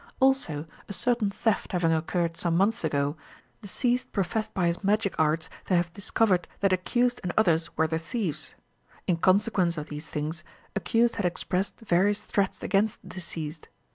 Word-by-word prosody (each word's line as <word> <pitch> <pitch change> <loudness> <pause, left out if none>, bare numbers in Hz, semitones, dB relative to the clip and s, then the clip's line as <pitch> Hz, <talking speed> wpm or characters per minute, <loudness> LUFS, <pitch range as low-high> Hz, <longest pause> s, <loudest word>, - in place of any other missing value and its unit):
Also, 260 - +2 0.2
a - - -4
certain 235 0 +1
theft 205 0 -1
having 170 -2 +2
occurred 165 +1 0
some 170 0 0
months 225 +5 +2
ago, 140 +1 0 0.5
deceased 245 +4 0
professed 215 +3 -1
by 180 -3 +2
his 170 +3 0
magic 205 0 +2
arts 160 +1 +2 0.2
to 185 - +2
have 175 -1 +1
discovered 200 -2 +1
that 195 -1 +3
accused 240 +7 +1
and 180 - -2
others 170 -6 +3
were 160 - +4
the 160 0 -1
thieves. 185 - -3 0.5
In 175 - +2
consequence 185 -1 +3
of 150 - -5
these 150 +1 -7
things, 155 +1 -3 0.3
accused 230 +6 +2
had 205 - 0
expressed 185 +4 -2
various 205 +1 +2
threats 195 -2 -1
against 205 +2 0
deceased. 165 -3 -6
185 Hz, 160 wpm, -27 LUFS, 165-210 Hz, 0.5 s, were